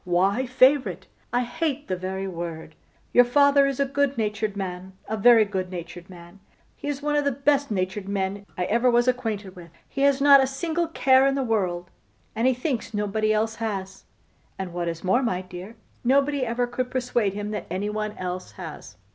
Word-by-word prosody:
Why 195 +8 +1
favourite? 260 +2 +3 0.3
I 245 - +2
hate 290 +3 -3
the 185 - -1
very 190 +1 -4
word. 170 -3 -6 0.4
Your 245 - +8
father 280 +2 +4
is 275 -1 -3
a 280 - +3
good 280 0 0
natured 210 -1 -2
man, 185 -1 -5
a 220 - -2
very 225 +1 +6
good 190 -2 -3
natured 175 0 -8
man: 175 +1 -13 0.4
he - - -8
is 290 -1 -3
one 295 0 0
of 295 - +2
the 280 - +1
best 280 +1 +1
natured 190 0 -2
men 200 0 -2
I 180 - 0
ever 235 +6 +2
was 240 +1 +3
acquainted 220 -6 -2
with. 175 -2 -12 0.2
He 275 - -5
has 280 -1 +4
not 280 -1 +7
a 265 - +2
single 330 +5 -2
care 265 -4 +4
in 275 - +1
the 275 - 0
world, 185 -7 -1 0.4
and 230 +3 +2
he 260 - +4
thinks 250 -4 -3
nobody 210 +1 0
else 220 +1 0
has; 195 -4 -5 0.5
and 190 -3 -5
what 175 -1 -2
is 165 -1 -4
more, 190 +8 +3
my 185 -7 -1
dear, 185 +4 -9 0.3
nobody 275 +2 +2
ever 240 +2 0
could 245 +1 -3
persuade 240 -6 0
him 205 0 -4
that 210 -4 -5
anybody 210 +3 -3
else 185 0 -5
has. - - -9
220 Hz, 195 wpm, -25 LUFS, 190-260 Hz, 0.5 s, Your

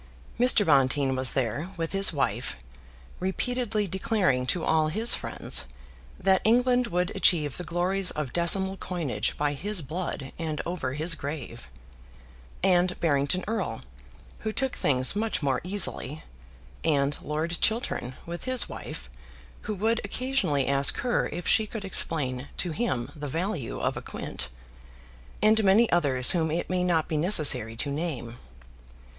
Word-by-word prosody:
Mr. 245 -4 +6
Bonteen 135 -2 +2
was 130 0 +2
there 135 - -2
with 165 -1 -3
his 195 0 +5
wife, 125 - -2 0.6
repeatedly 215 +3 -1
declaring 185 - 0
to 170 +4 0
all 160 -1 +2
his 220 +9 +4
friends 60 +1 +2 0.5
that 190 0 +2
England 245 +2 +3
would 180 -2 -1
achieve 150 -6 +3
the 180 - -5
glories 180 +2 0
of 150 -5 -4
decimal 190 +3 +2
coinage 170 -9 -3
by 145 0 0
his 185 +4 -3
blood 155 -2 -5
and 155 -2 -3
over 165 -7 -3
his 160 +4 +1
grave, 140 -5 -7 0.9
and 180 -1 +2
Barrington 145 +3 +1
Erle, 195 - -3 0.6
who 220 - -3
took 265 +3 -2
things 130 +3 +3
much 215 -5 -1
more 135 -2 0
easily, 175 -6 -1 0.6
and 145 -2 +1
Lord 160 +3 -3
Chiltern, 220 - -1
with 170 +1 -7
his 255 -1 +3
wife, - - -8 0.6
who 215 - -1
would 225 +4 0
occasionally 200 - -1
ask 140 0 +4
her 245 -1 0
if 175 - -6
she 220 - +3
could 210 -2 -7
explain 140 -8 0
to 175 - -1
him 145 - -2
the 145 -1 -6
value 165 - -3
of - - -1
a - - -5
quint, - - -6 0.9
and 220 +1 +4
many 205 +4 +5
others 140 -7 +3
whom 165 -3 0
it 170 +3 -3
may 180 -1 0
not 170 -3 +1
be 155 - -2
necessary 145 - +4
to 140 +5 -3
name. 140 -7 -4
170 Hz, 145 wpm, -26 LUFS, 140-195 Hz, 0.9 s, Mr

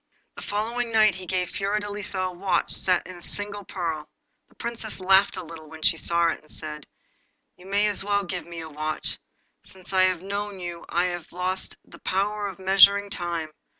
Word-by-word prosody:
The - - -8
following 230 +3 -1
night 215 -2 +5
he 185 0 -7
gave 180 -1 -1
Fiordelisa 205 0 -2
a - - -7
watch 185 +2 +1
set 180 -2 +2
in 185 -1 -9
a - - -13
single 205 +2 -2
pearl. 165 -5 -3 0.4
The - - -25
Princess 230 -3 -4
laughed 190 +1 +5
a 185 - -4
little 160 -2 -10
when 160 0 -10
she - - +5
saw 170 +1 +2
it, - - -2
and 155 - -20
said 150 -1 -4 0.7
'You 180 - -15
may 205 +1 +3
well 200 0 +1
give 180 -1 -4
me 170 -1 -6
a 160 - -7
watch, 155 +1 -2 0.4
for - - -16
since 190 +1 -10
I 185 0 +6
have 185 -1 0
known 200 0 -3
you 175 -1 -6
I 175 - +2
have 175 -2 -3
lost 185 +1 -3
the - - -15
power 205 +2 0
of 190 -3 -7
measuring 195 +1 +6
time. 170 -4 -2
185 Hz, 195 wpm, -26 LUFS, 170-205 Hz, 0.7 s, I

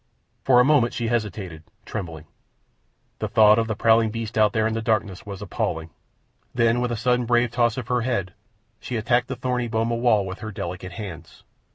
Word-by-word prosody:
For 125 -2 +5
a 125 - +5
moment 135 -5 +3
she 115 -2 -1
hesitated, 100 -8 -3 0.2
trembling. 80 -4 -6 0.9
The - - -2
thought 110 0 +5
of 115 - 0
the 110 - -2
prowling 115 +1 +4
beasts 115 0 -5
out 105 -1 +4
there 110 0 +1
in 110 - 0
the 115 - -2
darkness 105 -4 -1
was 100 0 -6
appalling. 80 -5 -3 0.6
Then, 115 0 +3
with 125 -1 -1
a 120 - -2
sudden 125 +1 +1
brave 120 0 +2
toss 120 -1 +1
of 125 -3 -5
her 125 -1 +1
head, 100 -6 -2 0.5
she 125 - -5
attacked 120 +2 +1
the 135 - -4
thorny 125 -1 -2
boma 115 +1 0
wall 115 -4 +2
with 95 +1 -6
her 110 - -6
delicate 90 -1 -6
hands. 85 -5 -9
110 Hz, 195 wpm, -24 LUFS, 100-120 Hz, 0.9 s, For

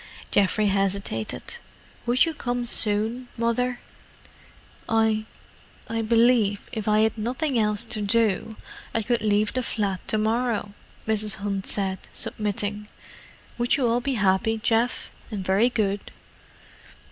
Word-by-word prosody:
Geoffrey 205 +2 +3
hesitated. 195 - -1 0.6
"Would 245 +5 +4
you 325 - -2
come 245 -4 -2
soon, 225 +2 +3
Mother?" 240 +2 0 1.1
"I—I 220 0 -2
believe 225 -2 +3
if 220 -3 -4
I 215 0 +4
had 220 0 +2
nothing 250 +4 -1
else 210 -1 +1
to 215 - -3
do 220 0 +1 0.4
I 225 - +1
could 240 +1 0
leave 210 0 +2
the 255 - 0
flat 200 -6 -2
to 215 - +1
morrow," 220 -1 0 0.3
Mrs. 215 -1 0
Hunt 200 -2 -3
said, 190 -2 -1 0.2
submitting. 210 0 -2 0.7
"Would 240 0 +2
you 265 - +1
all 235 +1 +2
be 270 +1 -1
happy, 210 +2 +2
Geoff?—and 225 -3 -2
very 195 +6 +3
good?" 205 -4 -1
220 Hz, 125 wpm, -25 LUFS, 205-235 Hz, 1.1 s, Would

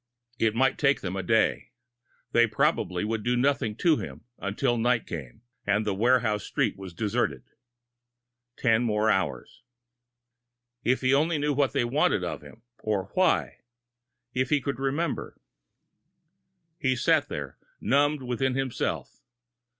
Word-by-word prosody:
It 110 -1 +2
might 135 +2 +2
take 140 -1 +3
them 95 0 -4
a 95 - -1
day 110 +2 +1 0.6
they 120 0 +5
probably 110 - 0
would 110 0 -2
do 120 +2 +1
nothing 130 -4 +1
to 160 +5 +3
him - - -7 0.2
until 100 +4 0
night 120 0 +1
came, 70 - -8 0.2
and 105 +1 +2
the 105 - 0
warehouse 110 -1 +2
street - - 0
was 95 -3 -9
deserted! 105 +1 -1 1.1
Ten 115 -1 +3
more 110 -2 +2
hours! 95 - -2 1.2
If 130 +2 +2
he 130 +1 +3
only 155 +3 +2
knew 145 0 0
what 140 -3 +1
they - - +1
wanted 135 +6 +2
of - - -4
him, 110 - -15 0.2
or 100 -3 -2
why! 185 -1 +1 0.7
If 130 0 0
he 150 - +3
could 140 -1 -4
remember! 140 +4 -2 1.4
He 130 -1 +1
sat 120 - +2
there, - - -6 0.2
numbed 145 +1 +2
within 125 +1 -1
himself. 135 -2 -3
120 Hz, 140 wpm, -27 LUFS, 105-135 Hz, 1.4 s, they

